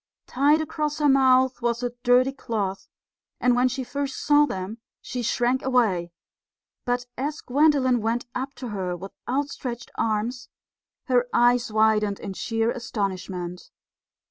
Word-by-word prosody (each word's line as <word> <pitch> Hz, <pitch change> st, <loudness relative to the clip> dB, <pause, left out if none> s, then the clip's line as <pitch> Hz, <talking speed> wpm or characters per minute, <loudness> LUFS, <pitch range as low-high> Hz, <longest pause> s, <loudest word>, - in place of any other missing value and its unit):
Tied 290 Hz, +4 st, +3 dB
across 300 Hz, -1 st, -2 dB
her 300 Hz, -1 st, +2 dB
mouth 260 Hz, -2 st, +4 dB
was 235 Hz, 0 st, -1 dB
a 245 Hz, -, -1 dB
dirty 250 Hz, +2 st, +4 dB
cloth, 210 Hz, -8 st, -3 dB, 0.5 s
and 250 Hz, -1 st, +3 dB
when 250 Hz, +1 st, +3 dB
she 260 Hz, +1 st, -3 dB
first 275 Hz, +1 st, -3 dB
saw 295 Hz, 0 st, +4 dB
them 190 Hz, +3 st, -5 dB, 0.2 s
she 250 Hz, -, -5 dB
shrank 245 Hz, +2 st, +1 dB
away; 215 Hz, -10 st, +1 dB, 0.7 s
but 245 Hz, 0 st, -1 dB
as 295 Hz, +3 st, -2 dB
Gwendolen 265 Hz, -3 st, +3 dB
went 230 Hz, +2 st, -1 dB
up 265 Hz, +2 st, -4 dB
to 250 Hz, -, -6 dB
her 185 Hz, -4 st, -3 dB
with 195 Hz, +3 st, -9 dB, 0.2 s
outstretched 260 Hz, -3 st, -3 dB
arms, 230 Hz, +3 st, -1 dB, 0.6 s
her 250 Hz, -2 st, +2 dB
eyes 240 Hz, -1 st, +3 dB
widened 215 Hz, -2 st, +2 dB
in 195 Hz, -, -6 dB
sheer 225 Hz, +3 st, -1 dB
astonishment. 190 Hz, -6 st, -4 dB
245 Hz, 140 wpm, -25 LUFS, 215-265 Hz, 0.7 s, mouth